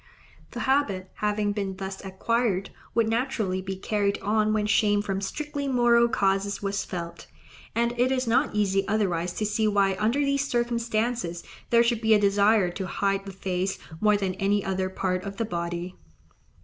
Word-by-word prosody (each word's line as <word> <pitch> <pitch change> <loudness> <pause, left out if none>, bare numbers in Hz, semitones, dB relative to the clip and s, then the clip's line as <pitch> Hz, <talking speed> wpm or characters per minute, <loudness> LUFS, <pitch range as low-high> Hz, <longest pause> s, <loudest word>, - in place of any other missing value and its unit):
The - - -6
habit 210 -9 0
having 210 0 0
been 200 -2 -3
thus 195 0 -6
acquired, 195 0 -1 0.2
would 230 -1 +3
naturally 225 -5 -1
be 190 0 -4
carried 200 +1 0
on 215 +1 +2
when 215 -1 +1
shame 205 -1 +3
from 195 -1 -2
strictly 285 +6 -4
moral 240 -2 +4
causes 195 -1 +1
was 200 -1 -2
felt; 170 -1 -7 0.5
and 235 +1 +1
it 255 +1 +3
is 260 -1 0
not 240 +1 +1
easy 195 -2 +2
otherwise 180 -5 0
to 215 - -2
see 215 +1 +1
why 200 -2 +2
under 220 +5 +1
these 280 0 +1
circumstances 235 -6 -1 0.3
there 235 0 +5
should 235 -1 0
be 220 -1 +5
a - - +4
desire 200 -1 +3
to 190 +1 -5
hide 195 +1 -1
the - - -5
face 190 0 -2 0.2
more 210 -1 +4
than 195 -2 -1
any 200 +1 +1
other 190 -1 -1
part 185 -1 -2
of 200 -1 -6
the 230 - -1
body. 175 -1 -4
205 Hz, 175 wpm, -26 LUFS, 190-230 Hz, 0.5 s, there